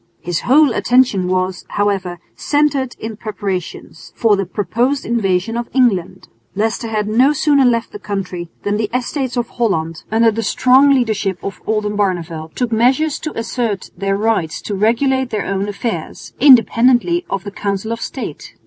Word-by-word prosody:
His 175 -1 -2
whole 280 0 +4
attention 245 -8 +2
was, 185 0 -1
however, 195 -3 -1 0.2
centred 290 -4 0
in 220 -1 -6
preparations 200 -5 -6
for 225 -3 +3
the 195 -2 -2
proposed 245 +7 -1
invasion 210 -2 0
of 235 0 -3
England. 230 -10 +1 0.3
Leicester 225 +3 -1
had 215 -2 -2
no 250 +7 +3
sooner 285 -2 +3
left 230 -2 +1
the 210 - -8
country 190 -4 -5
than 205 0 0
the 215 -1 -1
Estates 255 0 -2
of 240 -1 0
Holland, 165 -9 -1
under 225 +1 +4
the 225 +1 -3
strong 260 +4 +4
leadership 220 -8 +1
of 195 - -6
Oldenbarneveldt, 185 -7 -2
took 245 -2 -1
measures 260 +7 +2
to 310 - -6
assert 230 -3 -3
their 195 +2 -1
right 215 -6 +1
to 205 - -6
regulate 245 +6 +1
their 215 -4 -2
own 195 +1 -2
affairs, 205 -4 -5
independently 255 - +5
of 195 -1 -3
the 200 - -7
Council 200 +2 -3
of 230 - -4
State. - - -6
220 Hz, 160 wpm, -17 LUFS, 195-250 Hz, 0.3 s, independently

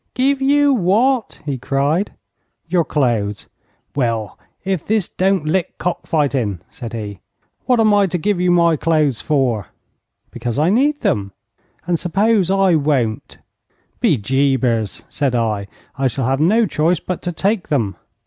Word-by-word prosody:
'Give 270 +1 +1
you 285 +1 +4
what?' 230 +2 +1
he 140 -4 -3
cried. 140 - 0 0.5
'Your 175 0 +2
clothes.' 115 -10 -1 0.5
'Well, 115 -6 -1 0.3
if 190 -4 -1
this 215 -3 0
don't 190 -3 0
lick 170 +3 -1
cock 180 - -3
fighting!' 135 - 0
said 115 -2 -8
he. 105 -4 -6 0.5
'What 250 -2 +3
am 215 -2 +4
I 200 -1 +4
to 180 - -2
give 190 +3 0
you 180 - +2
my 170 -2 +4
clothes 155 -6 +1
for?' 130 - 0 0.6
'Because 120 -1 -4
I 155 +5 +3
need 285 +6 +2
them.' 100 -2 -1 0.5
'And 175 -1 0
suppose 195 +1 +1
I 195 -2 +3
won't?' 140 -8 0 0.6
'Be 205 - +3
jabers,' 125 -2 0
said 135 -4 -1
I, 110 -4 -1 0.3
'I 135 - +2
shall 130 +1 -2
have 135 +2 0
no 215 +9 +3
choice 170 -2 +1
but 185 - -5
to 175 - -3
take 195 +4 -1
them.' 115 -10 0
155 Hz, 150 wpm, -19 LUFS, 125-195 Hz, 0.6 s, you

